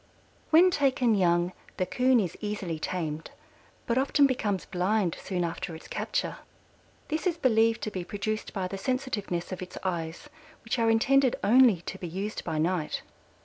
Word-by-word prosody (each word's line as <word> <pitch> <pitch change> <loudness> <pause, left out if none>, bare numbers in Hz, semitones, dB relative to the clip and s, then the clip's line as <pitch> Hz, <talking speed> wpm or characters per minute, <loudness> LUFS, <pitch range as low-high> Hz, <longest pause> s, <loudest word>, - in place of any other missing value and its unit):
When 350 +3 +6
taken 260 -6 +2
young 175 -2 +2 0.2
the 185 - +1
Coon 255 +5 +3
is 180 -5 -2
easily 200 -6 -3
tamed, 160 -2 -3 0.6
but 235 +2 +1
often 280 +1 +4
becomes 215 -8 0
blind 185 0 0
soon 180 -2 -2
after 170 0 -4
its 160 - -11
capture. - - -2 0.7
This 315 +4 -1
is 340 -2 0
believed 225 -6 +3
to 215 - -2
be 185 -3 -4
produced 210 +3 -3
by 190 -3 -2
the 195 +1 -6
sensitiveness 205 -8 -2
of 185 - -5
its 180 0 -8
eyes, 170 - -3 0.4
which 230 +2 -2
are 230 0 +3
intended 260 +3 +4
only 230 -5 +6
to 190 +2 -7
be 180 - -5
used 195 +6 -4
by 155 - -3
night. 165 0 -1
205 Hz, 165 wpm, -28 LUFS, 180-250 Hz, 0.7 s, When